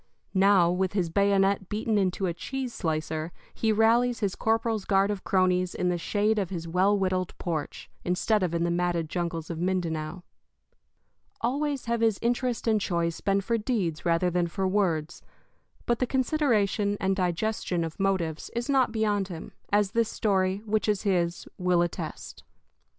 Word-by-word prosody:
Now, 190 Hz, -3 st, +5 dB
with 185 Hz, +1 st, 0 dB
his 180 Hz, -5 st, 0 dB
bayonet 200 Hz, 0 st, +2 dB
beaten 215 Hz, +1 st, -1 dB
into 190 Hz, 0 st, 0 dB
a 175 Hz, -, 0 dB
cheese 260 Hz, +7 st, -5 dB
slicer, 160 Hz, -1 st, -2 dB, 0.2 s
he 225 Hz, -, +1 dB
rallies 230 Hz, +3 st, +3 dB
his 200 Hz, -4 st, 0 dB
corporal's 225 Hz, -1 st, 0 dB
guard 195 Hz, +1 st, +2 dB
of 200 Hz, -2 st, -4 dB
cronies 185 Hz, -1 st, +1 dB
in 180 Hz, -, 0 dB
the 175 Hz, -, 0 dB
shade 210 Hz, +4 st, +1 dB
of 190 Hz, -4 st, -2 dB
his 170 Hz, -3 st, -5 dB
well 190 Hz, +5 st, +3 dB
whittled 185 Hz, -2 st, -1 dB
porch, 160 Hz, -4 st, -4 dB, 0.2 s
instead 185 Hz, +4 st, +1 dB
of 175 Hz, -2 st, 0 dB
in 170 Hz, -, +1 dB
the 170 Hz, -, +1 dB
matted 170 Hz, -2 st, 0 dB
jungles 170 Hz, -2 st, -3 dB
of 165 Hz, -, -5 dB
Mindanao. 175 Hz, -2 st, -2 dB, 1.2 s
Always 280 Hz, +3 st, -1 dB
have 235 Hz, 0 st, -1 dB
his 225 Hz, -3 st, +3 dB
interest 240 Hz, 0 st, -1 dB
and 215 Hz, -2 st, +3 dB
choice 170 Hz, -2 st, -1 dB
been 195 Hz, 0 st, +1 dB
for 230 Hz, +3 st, 0 dB
deeds 205 Hz, -9 st, -1 dB
rather 175 Hz, +1 st, +2 dB
than 175 Hz, 0 st, +1 dB
for 190 Hz, +2 st, -2 dB
words; 175 Hz, -5 st, 0 dB, 0.6 s
but 240 Hz, -1 st, +1 dB
the 255 Hz, -, +1 dB
consideration 230 Hz, -7 st, +1 dB
and 190 Hz, 0 st, +1 dB
digestion 180 Hz, -1 st, -1 dB
of 165 Hz, +2 st, -6 dB
motives 185 Hz, -5 st, -1 dB
is 235 Hz, 0 st, -2 dB
not 270 Hz, -4 st, +3 dB
beyond 210 Hz, -3 st, 0 dB
him, 170 Hz, -4 st, -8 dB, 0.2 s
as 205 Hz, -1 st, +3 dB
this 230 Hz, 0 st, +1 dB
story, 195 Hz, -2 st, 0 dB
which 215 Hz, 0 st, 0 dB
is 205 Hz, -2 st, 0 dB
his, 175 Hz, -4 st, 0 dB
will 180 Hz, -1 st, +3 dB
attest. 175 Hz, -, -6 dB
195 Hz, 165 wpm, -27 LUFS, 175-220 Hz, 1.2 s, Now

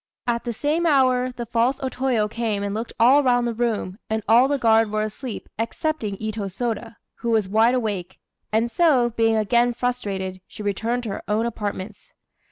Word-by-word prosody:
At 235 Hz, 0 st, -1 dB
the 240 Hz, -, -1 dB
same 300 Hz, +8 st, 0 dB
hour, 255 Hz, -3 st, +3 dB
the 240 Hz, -1 st, -6 dB
false 235 Hz, +3 st, +1 dB
O 265 Hz, -, -2 dB
Toyo 255 Hz, -5 st, 0 dB
came 215 Hz, -2 st, -2 dB
and 200 Hz, 0 st, -2 dB
looked 225 Hz, +2 st, -4 dB
all 260 Hz, +5 st, +6 dB
round 245 Hz, -3 st, +2 dB
the 235 Hz, -, -1 dB
room, 220 Hz, -4 st, -2 dB
and 220 Hz, 0 st, -1 dB
all 235 Hz, +4 st, +6 dB
the 285 Hz, 0 st, +1 dB
guard 225 Hz, -3 st, +4 dB
were 215 Hz, 0 st, -1 dB
asleep, 215 Hz, +2 st, -6 dB
excepting 230 Hz, -, -2 dB
Itô 215 Hz, -1 st, -4 dB
Sôda, 230 Hz, +2 st, -4 dB, 0.2 s
who 235 Hz, -, -3 dB
was 220 Hz, -4 st, +2 dB
wide 225 Hz, +5 st, +3 dB
awake; 200 Hz, -7 st, -3 dB, 0.3 s
and 225 Hz, +2 st, +1 dB
so, 275 Hz, -8 st, +3 dB
being 225 Hz, 0 st, +2 dB
again 235 Hz, +3 st, +2 dB
frustrated, 195 Hz, -7 st, -3 dB
she 210 Hz, -, -9 dB
returned 225 Hz, +5 st, -1 dB
to 225 Hz, -, -4 dB
her 195 Hz, -, -4 dB
own 215 Hz, +3 st, +1 dB
apartments. 210 Hz, -3 st, -5 dB
230 Hz, 185 wpm, -23 LUFS, 215-245 Hz, 0.3 s, all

